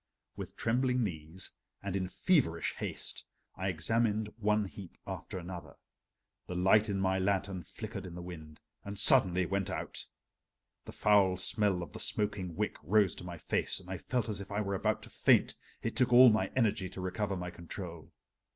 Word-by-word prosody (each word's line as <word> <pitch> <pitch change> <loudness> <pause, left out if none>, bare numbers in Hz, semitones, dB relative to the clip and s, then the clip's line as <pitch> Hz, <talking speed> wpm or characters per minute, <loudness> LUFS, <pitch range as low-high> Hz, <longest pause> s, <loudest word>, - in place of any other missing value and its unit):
With - - -7
trembling 125 +2 +1
knees 85 -1 -3 0.3
and 100 -1 -3
in 95 -1 -1
feverish 95 - +1
haste - - -4 0.3
I 95 - -3
examined 105 +4 0
one 105 -1 +2
heap 95 -1 -10
after - - -6
another. 90 0 -7 0.7
The 90 - -5
light 100 +4 +4
in 100 -1 -1
my 95 0 +1
lantern 95 -1 0
flickered 85 +4 -7
in 85 - -9
the 90 - -6
wind 80 -4 -9 0.2
and 100 0 -6
suddenly 95 -5 +5
went 100 +1 -1
out. - - -4 0.8
The - - -8
foul 100 -3 +4
smell 100 -1 +2
of - - -10
the - - -7
smoking 95 -5 0
wick - - -1
rose 95 +3 +3
to - - -8
my 90 -1 -7
face 80 - -1
and 95 0 -11
I 95 - -4
felt 125 -3 -1
as 105 -2 -1
if 100 - -9
I 100 - -1
were 100 -2 -1
about 95 - 0
to - - -12
faint, - - +4 0.3
it 115 - -2
took 125 -2 +3
all 125 0 +9
my 110 - +1
energy 105 -6 +1
to 95 - -9
recover 95 +2 -2
my 90 -1 -4
control. 85 -1 -8
95 Hz, 180 wpm, -32 LUFS, 90-105 Hz, 0.8 s, all